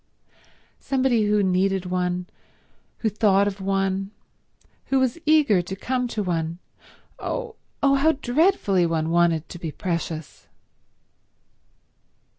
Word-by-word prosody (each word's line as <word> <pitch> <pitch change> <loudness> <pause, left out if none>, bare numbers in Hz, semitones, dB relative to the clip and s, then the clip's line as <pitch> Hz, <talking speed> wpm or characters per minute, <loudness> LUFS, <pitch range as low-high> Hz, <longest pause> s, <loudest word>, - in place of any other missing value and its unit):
Somebody 255 -5 +1
who 210 0 +2
needed 190 0 +1
one, 180 0 -1 0.8
who 220 - +2
thought 200 -2 +3
of 200 -1 -4
one, 195 0 -1 0.8
who 270 - +1
was 260 +4 0
eager 295 - +4
to 175 +2 -6
come 250 +5 -2
to 220 -3 -3
one—oh, 180 - -6 0.3
oh 275 0 +5
how 315 +4 +3
dreadfully 250 - +2
one 165 -1 -1
wanted 170 -2 +2
to 175 - -9
be 165 -2 -4
precious! 165 -2 -5
195 Hz, 110 wpm, -24 LUFS, 175-250 Hz, 0.8 s, oh